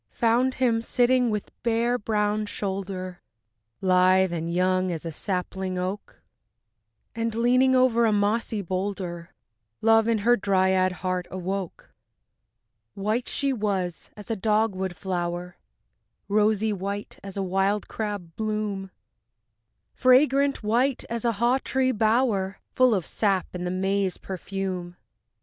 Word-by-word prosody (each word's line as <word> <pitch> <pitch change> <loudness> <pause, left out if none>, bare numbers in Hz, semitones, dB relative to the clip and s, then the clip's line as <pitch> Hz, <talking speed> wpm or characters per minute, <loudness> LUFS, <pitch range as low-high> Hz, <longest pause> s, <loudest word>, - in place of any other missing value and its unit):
Found 240 +3 +2
him 235 -3 +2
sitting 245 +1 +2
with 210 -2 -3
bare 235 +1 +1
brown 210 0 0
shoulder, 190 -3 -4 0.6
Lithe 185 0 +4
and 165 0 -3
young 185 +1 +1
as 165 -1 -5
a 165 - -3
sapling 185 +2 -3
oak, 185 +3 -5 0.9
And 230 -1 -2
leaning 255 +3 +4
over 245 -2 +4
a - - +3
mossy 210 +1 0
boulder, 185 -2 -4 0.4
Love 225 0 +4
in 230 -1 +2
her 240 +1 +6
dryad 190 -2 +2
heart 185 -1 -1
awoke. 185 0 -5 1.1
III 195 - -6
White 225 +4 0
she 275 -1 0
was 195 -7 -2
as 210 +2 -7
a - - +1
dogwood 205 -3 0
flower, 175 -1 -3 0.7
Rosy 215 +1 +2
white 200 +1 -5
as 195 0 -8
a 195 - 0
wild 195 +2 0
crab 205 -6 -5
bloom, 210 -3 -3 1.0
Fragrant 270 +1 +3
white 240 +5 +1
as 235 0 -2
a 235 - +2
haw 240 +5 +2
tree 260 -1 +1
bower 215 -3 +1
Full 255 -3 +4
of 185 -4 -2
sap 195 -4 0
and 180 0 -4
the - - -1
May's 190 +1 0
perfume. 185 -2 -5
205 Hz, 130 wpm, -25 LUFS, 185-230 Hz, 1.1 s, her